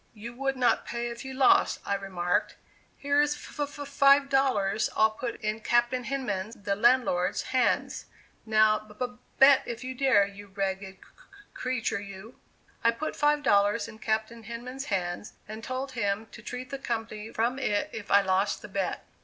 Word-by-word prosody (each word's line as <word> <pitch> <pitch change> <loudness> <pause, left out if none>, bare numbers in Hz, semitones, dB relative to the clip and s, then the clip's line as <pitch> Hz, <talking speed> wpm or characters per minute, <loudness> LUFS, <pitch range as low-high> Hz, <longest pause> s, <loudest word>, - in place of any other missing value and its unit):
"You 230 +3 -8
would 270 +1 -2
not 250 -1 +2
pay 235 0 -4
if 235 - -8
you 265 0 -7
lost," 265 0 +4
I - - 0
remarked. 185 -3 -1 0.4
"Here's 290 +1 +2
f 295 - -12
f 290 0 -4
five 280 0 +5
dollars 255 -7 +2
I'll 220 0 +4
put 235 +2 -5
in 215 +1 -2
Captain 240 +2 +1
Hinman's 225 -6 -3
(the 200 -1 -2
landlord's) 210 -5 +2
hands. 255 -2 +1 0.4
Now 215 -1 +4
b 215 0 -16
b 250 +1 -3 0.2
bet 270 0 +7
if 235 +1 -5
you 260 0 -4
dare, 255 -6 +4
you 200 +1 -11
ragged 195 0 -3
c 190 - -31
c - - -22 0.3
creature, 250 -4 -2
you." 200 +3 -11 0.4
I 230 - +5
put 230 +7 -3
five 295 0 +2
dollars 205 -1 +3
in 220 -1 -12
Captain 220 +1 -2
Hinman's 245 +4 -7
hands, 185 -3 -3
and 220 +1 -8
told 260 +2 -4
him 210 -3 -1
to 235 - -11
treat 250 +2 -7
the 275 - -4
company 225 -3 -4
from 240 +4 0
it 205 -6 -1
if 210 -2 -7
I 200 - +6
lost 190 +1 0
the - - -9
bet. - - -3
230 Hz, 180 wpm, -28 LUFS, 205-260 Hz, 0.4 s, bet